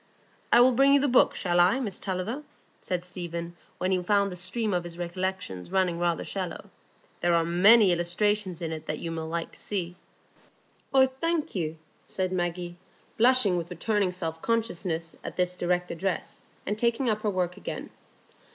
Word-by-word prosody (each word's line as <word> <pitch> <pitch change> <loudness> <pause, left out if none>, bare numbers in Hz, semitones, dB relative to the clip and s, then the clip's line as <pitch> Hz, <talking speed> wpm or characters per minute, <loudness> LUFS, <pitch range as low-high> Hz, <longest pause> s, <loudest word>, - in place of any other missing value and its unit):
"I 240 - +7
will 255 +1 +6
bring 275 +3 +5
you - - +5
the 285 - +2
book, 250 -1 +4
shall 175 -2 +1
I, 185 +9 +5
Miss 210 -8 -2
Tulliver?" 195 +8 -3 0.4
said 180 -1 -2
Stephen, 170 -1 -5 0.2
when 185 - -1
he 185 -1 +2
found 200 +1 +2
the - - -6
stream 200 +4 -1
of 175 -1 0
his 175 0 -8
recollections 175 - -4
running 185 -3 +1
rather 170 -1 0
shallow. 185 -4 -5 0.5
"There 175 -1 +2
are 165 - +3
many 195 +4 +6
illustrations 180 +1 0
in 165 - -2
it 160 -1 -6
that 155 - -2
you 165 - -5
will 160 -1 -4
like 165 +1 -3
to - - -11
see." 180 -4 -3 1.0
"Oh, 265 -1 +6
thank 315 +5 -2
you," 160 -4 -2 0.3
said 185 -1 -3
Maggie, 175 -1 -2 0.4
blushing 235 -6 +4
with 170 0 -4
returning 205 +1 0
self 165 -3 -5
consciousness 180 -8 -2
at - - -7
this 180 0 +1
direct 180 0 -1
address, 185 +2 -3 0.2
and 210 +2 -2
taking 235 +2 +1
up 215 -2 +1
her 215 - 0
work 180 -2 -1
again. - - -6
180 Hz, 180 wpm, -27 LUFS, 175-210 Hz, 1.0 s, I